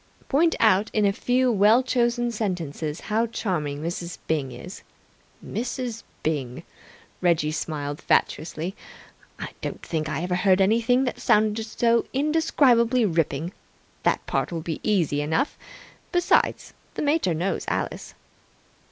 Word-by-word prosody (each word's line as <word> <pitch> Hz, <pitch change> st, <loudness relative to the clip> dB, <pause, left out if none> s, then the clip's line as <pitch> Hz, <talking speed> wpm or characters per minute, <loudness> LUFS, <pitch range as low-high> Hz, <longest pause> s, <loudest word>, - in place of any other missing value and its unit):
"Point 325 Hz, +4 st, +3 dB
out 215 Hz, -1 st, +4 dB
in 215 Hz, -1 st, +2 dB
a 200 Hz, -, +3 dB
few 250 Hz, +3 st, +2 dB
well 215 Hz, +4 st, +5 dB
chosen 240 Hz, -1 st, +1 dB
sentences 170 Hz, -8 st, -3 dB
how 225 Hz, +2 st, 0 dB
charming 155 Hz, -10 st, -3 dB
Mrs. 170 Hz, 0 st, -4 dB
Byng 145 Hz, -5 st, -1 dB
is.. 145 Hz, +11 st, -9 dB, 0.3 s
." -, -, -23 dB
"Mrs. 240 Hz, -1 st, -4 dB, 0.2 s
Byng!" 135 Hz, -6 st, -2 dB, 0.6 s
Reggie 165 Hz, -4 st, +2 dB
smiled 145 Hz, -2 st, -4 dB
fatuously. 165 Hz, +4 st, 0 dB, 0.6 s
"I -, -, -5 dB
don't -, -, -5 dB
think 155 Hz, -2 st, -2 dB
I 155 Hz, +2 st, -2 dB
ever 180 Hz, 0 st, -1 dB
heard 185 Hz, 0 st, +3 dB
anything 230 Hz, +6 st, +3 dB
that 250 Hz, -, -3 dB
sounded 215 Hz, +1 st, +2 dB
so 235 Hz, +1 st, +2 dB
indescribably 260 Hz, -5 st, +3 dB
ripping. 165 Hz, -1 st, -1 dB, 0.5 s
That -, -, +1 dB
part'll 170 Hz, -2 st, -2 dB
be 160 Hz, -1 st, -4 dB
easy 170 Hz, -9 st, +1 dB
enough. 160 Hz, -, 0 dB, 0.6 s
Besides, 355 Hz, 0 st, +2 dB, 0.2 s
the -, -, -2 dB
mater 290 Hz, -, +2 dB
knows 180 Hz, +5 st, -2 dB
Alice." -, -, -3 dB
195 Hz, 130 wpm, -25 LUFS, 160-235 Hz, 0.6 s, well